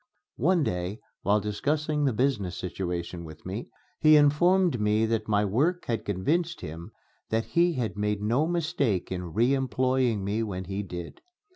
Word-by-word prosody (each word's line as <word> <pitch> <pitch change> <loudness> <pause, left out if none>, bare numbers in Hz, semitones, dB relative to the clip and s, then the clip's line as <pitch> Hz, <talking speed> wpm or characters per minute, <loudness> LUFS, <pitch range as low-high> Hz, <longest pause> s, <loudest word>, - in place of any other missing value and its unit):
One 170 +5 +3
day, 90 0 -2 0.2
while 105 +1 +3
discussing 150 +8 -1
the 135 - +3
business 110 -7 0
situation 90 -1 -4
with 80 -1 -11
me, 95 +6 -5 0.3
he 155 0 +7
informed 160 - +4
me 105 +1 +2
that 110 -1 -1
my 105 -1 +2
work 150 - +1
had 115 -2 -2
convinced 160 - 0
him 80 +2 -7 0.4
that 115 +1 0
he 170 0 +2
had 120 -7 -2
made 105 0 -1
no 120 +9 +1
mistake 150 - 0
in 90 -2 -4
re 120 +6 +3
employing 130 -3 +1
me 105 +3 -1
when 95 -4 -3
he 95 +2 -4
did. 85 -3 -7
110 Hz, 160 wpm, -27 LUFS, 95-145 Hz, 0.4 s, he